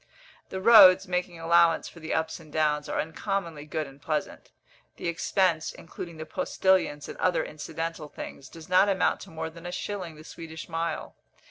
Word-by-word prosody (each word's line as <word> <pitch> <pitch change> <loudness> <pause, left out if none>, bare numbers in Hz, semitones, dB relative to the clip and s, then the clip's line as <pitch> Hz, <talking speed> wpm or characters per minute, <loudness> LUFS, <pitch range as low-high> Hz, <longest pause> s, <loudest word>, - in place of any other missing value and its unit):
The 190 - -4
roads, 195 -3 +8
making 180 -1 -2
allowance 170 0 +4
for 170 - -12
the 160 0 -6
ups 160 +1 -1
and 155 -2 -15
downs, 150 -1 +1
are - - -1
uncommonly 165 -2 -3
good 155 0 -2
and 135 0 -14
pleasant. 155 0 -3 0.5
The - - -5
expense, 170 -1 +1
including 170 0 -9
the 155 - -6
postillions 160 -3 +1
and - - -9
other 175 -3 +2
incidental 160 0 -5
things, 135 -2 -9
does 165 -1 -12
not 185 +3 +5
amount 190 -2 +2
to - - -10
more 160 0 -5
than 170 +1 -10
a - - -5
shilling 180 -3 -5
the 155 - -13
Swedish 160 -1 -9
mile. 165 -1 -3
165 Hz, 175 wpm, -27 LUFS, 155-180 Hz, 0.5 s, roads